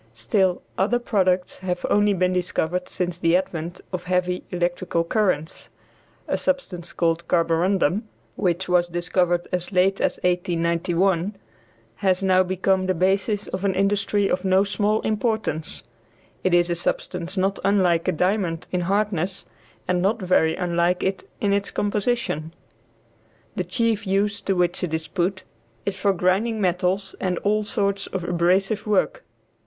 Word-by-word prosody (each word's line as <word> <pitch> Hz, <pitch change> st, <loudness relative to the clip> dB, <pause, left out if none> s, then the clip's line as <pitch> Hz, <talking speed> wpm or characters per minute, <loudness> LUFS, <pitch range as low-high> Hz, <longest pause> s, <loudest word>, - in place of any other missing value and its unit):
Still 180 Hz, -, +1 dB, 0.2 s
other 215 Hz, +6 st, +3 dB
products 185 Hz, -6 st, 0 dB
have 180 Hz, -1 st, -3 dB
only 205 Hz, -1 st, +3 dB
been 185 Hz, 0 st, +1 dB
discovered 180 Hz, 0 st, -1 dB
since 175 Hz, -1 st, -2 dB
the 165 Hz, 0 st, +3 dB
advent 175 Hz, -2 st, -4 dB
of 180 Hz, -1 st, -4 dB
heavy 180 Hz, 0 st, 0 dB
electrical 175 Hz, -1 st, -1 dB
currents. 170 Hz, -4 st, -1 dB, 0.6 s
A -, -, 0 dB
substance 185 Hz, -12 st, -2 dB
called 165 Hz, 0 st, 0 dB
carborundum, 175 Hz, +4 st, +2 dB, 0.3 s
which 185 Hz, -1 st, 0 dB
was 180 Hz, -1 st, +3 dB
discovered 175 Hz, 0 st, 0 dB
as 180 Hz, +1 st, -1 dB
late 190 Hz, +1 st, +2 dB
as -, -, +1 dB
1891, 175 Hz, +2 st, +1 dB, 0.6 s
has 190 Hz, -1 st, +1 dB
now 185 Hz, -1 st, +4 dB
become 185 Hz, +1 st, +1 dB
the 185 Hz, -, +1 dB
basis 195 Hz, +4 st, +1 dB
of 185 Hz, +1 st, -4 dB
an 195 Hz, -2 st, +1 dB
industry 200 Hz, +1 st, +1 dB
of 180 Hz, 0 st, -1 dB
no 190 Hz, 0 st, +4 dB
small 210 Hz, +1 st, 0 dB
importance. 215 Hz, -7 st, -1 dB, 0.6 s
It 185 Hz, -1 st, +3 dB
is 175 Hz, 0 st, +3 dB
a -, -, +3 dB
substance 175 Hz, +2 st, -3 dB
not 195 Hz, +1 st, +1 dB
unlike 185 Hz, -4 st, +2 dB
a -, -, +4 dB
diamond 180 Hz, -1 st, 0 dB
in 180 Hz, -, 0 dB
hardness, 195 Hz, -1 st, -1 dB, 0.4 s
and 180 Hz, -1 st, +1 dB
not 210 Hz, +5 st, +1 dB
very 170 Hz, -4 st, +2 dB
unlike 175 Hz, 0 st, 0 dB
it 190 Hz, 0 st, -2 dB
in 200 Hz, -1 st, +1 dB
its 200 Hz, 0 st, 0 dB
composition. 205 Hz, -7 st, -1 dB, 1.0 s
The 185 Hz, -, -1 dB
chief 220 Hz, +2 st, 0 dB
use 200 Hz, +2 st, +1 dB
to 195 Hz, -, 0 dB
which 175 Hz, 0 st, 0 dB
it 160 Hz, -3 st, -1 dB
is 160 Hz, 0 st, -4 dB
put 185 Hz, +1 st, -1 dB, 0.4 s
is 200 Hz, -, -1 dB
for 200 Hz, +1 st, +2 dB
grinding 195 Hz, +5 st, +1 dB
metals 185 Hz, +1 st, 0 dB
and 180 Hz, -2 st, -1 dB
all 210 Hz, +1 st, +2 dB
sorts 200 Hz, -2 st, -1 dB
of 190 Hz, -2 st, -4 dB
abrasive 185 Hz, +5 st, +1 dB
work. 210 Hz, -, +1 dB
185 Hz, 150 wpm, -23 LUFS, 175-200 Hz, 1.0 s, now